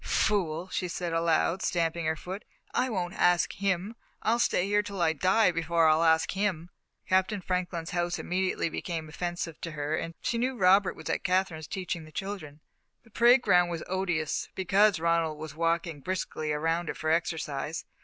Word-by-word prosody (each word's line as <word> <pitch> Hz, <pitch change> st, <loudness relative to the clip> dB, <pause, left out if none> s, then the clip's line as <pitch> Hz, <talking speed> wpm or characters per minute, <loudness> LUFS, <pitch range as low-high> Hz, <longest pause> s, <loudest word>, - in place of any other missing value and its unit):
"Fool!" 180 Hz, -5 st, 0 dB
she 180 Hz, -, -2 dB
said 175 Hz, -1 st, -3 dB
aloud, 165 Hz, +2 st, +1 dB
stamping 170 Hz, -1 st, 0 dB
her 160 Hz, -, +1 dB
foot; 185 Hz, +6 st, -7 dB, 0.3 s
"I 255 Hz, -, +1 dB
won't 180 Hz, -5 st, -2 dB
ask 175 Hz, -2 st, +3 dB
him. 195 Hz, +2 st, -1 dB, 0.3 s
I'll 230 Hz, +2 st, +2 dB
stay 185 Hz, -5 st, +2 dB
here 205 Hz, +1 st, +2 dB
till 200 Hz, -2 st, -7 dB
I 160 Hz, -2 st, +3 dB
die 185 Hz, +5 st, +3 dB
before 165 Hz, -1 st, +2 dB
I'll 155 Hz, +1 st, +4 dB
ask 160 Hz, -1 st, +3 dB
him!" 190 Hz, -4 st, -2 dB, 0.4 s
Captain 190 Hz, +3 st, +2 dB
Franklin's 180 Hz, -2 st, -3 dB
house 175 Hz, 0 st, -1 dB
immediately 185 Hz, -1 st, -1 dB
became 165 Hz, -1 st, -4 dB
offensive 175 Hz, 0 st, -4 dB
to 165 Hz, -, -5 dB
her, 150 Hz, +1 st, -2 dB
and 165 Hz, +1 st, -4 dB
she 235 Hz, -, -1 dB
knew 255 Hz, +1 st, -1 dB
Robert 195 Hz, 0 st, +4 dB
was -, -, -9 dB
at -, -, -2 dB
Katherine's, 180 Hz, -4 st, 0 dB
teaching 180 Hz, -4 st, -4 dB
the 155 Hz, -, -14 dB
children. 160 Hz, -6 st, -6 dB, 0.4 s
The 225 Hz, -, -22 dB
parade 240 Hz, +4 st, +5 dB
ground 180 Hz, -1 st, +4 dB
was 170 Hz, -2 st, -4 dB
odious, 180 Hz, -5 st, -1 dB
because 195 Hz, +1 st, +3 dB
Ronald 165 Hz, -2 st, +1 dB
was 155 Hz, 0 st, -7 dB
walking 165 Hz, 0 st, -1 dB
briskly 155 Hz, -2 st, -3 dB
around 165 Hz, +3 st, 0 dB
it -, -, -4 dB
for 155 Hz, -, -1 dB
exercise. 160 Hz, -2 st, -2 dB
175 Hz, 175 wpm, -28 LUFS, 160-190 Hz, 0.4 s, parade